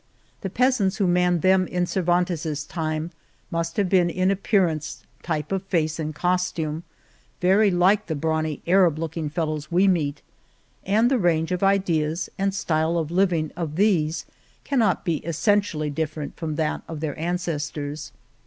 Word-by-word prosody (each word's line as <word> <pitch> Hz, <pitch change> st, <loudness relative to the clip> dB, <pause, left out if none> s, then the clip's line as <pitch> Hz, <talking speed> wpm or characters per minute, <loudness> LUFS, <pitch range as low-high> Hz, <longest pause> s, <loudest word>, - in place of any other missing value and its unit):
The 195 Hz, -, -3 dB
peas 255 Hz, +3 st, +2 dB
ants 190 Hz, -1 st, +1 dB
who 200 Hz, -, +2 dB
manned 180 Hz, -1 st, +2 dB
them 185 Hz, -1 st, +4 dB
in 180 Hz, 0 st, 0 dB
Cervantes's 175 Hz, -4 st, 0 dB
time 155 Hz, 0 st, -3 dB, 0.4 s
must 165 Hz, 0 st, -2 dB
have 200 Hz, -2 st, +2 dB
been 180 Hz, -2 st, +3 dB
in 185 Hz, +2 st, +1 dB
appearance, 185 Hz, -6 st, 0 dB, 0.2 s
type 155 Hz, -2 st, -3 dB
of 195 Hz, -1 st, 0 dB
face 160 Hz, -4 st, 0 dB
and 155 Hz, -1 st, -3 dB
costume, 170 Hz, -3 st, -1 dB, 0.6 s
very 195 Hz, +4 st, +4 dB
like 190 Hz, +3 st, +3 dB
the 160 Hz, -, -2 dB
brawny 155 Hz, 0 st, -1 dB
Arab 180 Hz, -3 st, +4 dB
looking 160 Hz, -1 st, -3 dB
fellows 155 Hz, -1 st, -3 dB
we 185 Hz, +3 st, +4 dB
meet, 150 Hz, -6 st, 0 dB, 0.6 s
and 220 Hz, +5 st, +3 dB
the 260 Hz, -, +3 dB
range 165 Hz, -3 st, +1 dB
of 180 Hz, -, -1 dB
ideas 170 Hz, -5 st, +1 dB
and 195 Hz, 0 st, 0 dB
style 160 Hz, -2 st, 0 dB
of 160 Hz, -1 st, -2 dB
living 175 Hz, -4 st, +1 dB
of 165 Hz, -3 st, -4 dB
these 170 Hz, -5 st, +1 dB, 0.4 s
cannot 225 Hz, -11 st, +1 dB
be 170 Hz, -4 st, +1 dB
essentially 170 Hz, -1 st, 0 dB
different 155 Hz, 0 st, -4 dB
from 155 Hz, -2 st, -4 dB
that 155 Hz, -1 st, -1 dB
of 160 Hz, -2 st, -6 dB
their 150 Hz, -2 st, -2 dB
ances 170 Hz, -3 st, -2 dB
tors. 145 Hz, 0 st, -6 dB
170 Hz, 160 wpm, -24 LUFS, 155-185 Hz, 0.6 s, them